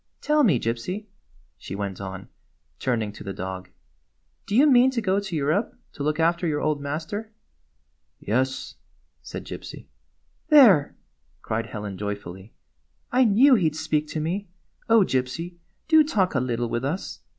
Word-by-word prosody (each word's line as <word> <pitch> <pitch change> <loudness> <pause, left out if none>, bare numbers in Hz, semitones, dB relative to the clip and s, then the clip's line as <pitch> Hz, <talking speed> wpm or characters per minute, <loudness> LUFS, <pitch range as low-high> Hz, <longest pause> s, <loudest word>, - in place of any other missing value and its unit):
Tell 300 0 +2
me, 170 - +4
Gypsy," 120 - -3 0.5
she 95 - -7
went 100 -1 -4
on, 95 -1 -7 0.5
turning 115 -5 -1
to 105 - -11
the 100 - -5
dog, 95 0 -6 0.4
" - - -46
do 205 - -2
you 270 +5 +6
mean 260 -3 +6
to 260 -2 -2
go 195 -2 +1
to 195 -4 -5
Europe 155 +9 0 0.2
to - - -9
look 150 +2 0
after 170 +1 +2
your 150 -2 0
old 150 -1 -1
master?" 160 +10 -4 0.9
"Yes," 130 +5 -2 0.4
said - - -8
Gypsy. - - -8 0.3
" - - -44
There! 220 - +6 0.2
" 65 +5 -41
cried 110 0 -2
Helen 105 -3 -6
joyfully. 100 -1 -6 0.3
" 80 - -45
I 255 +1 +4
knew 240 +6 +6
he 185 -10 +4
'd 155 - -13
speak 155 -1 -1
to 155 - -4
me! 180 +6 -2 0.4
Oh, 225 -1 +6
Gypsy, 165 +3 -2 0.3
do 315 -1 +6
talk 200 - 0
a 130 - +2
little 120 -1 -1
with 120 +2 -2
us 160 +8 -4
150 Hz, 170 wpm, -25 LUFS, -, 0.9 s, you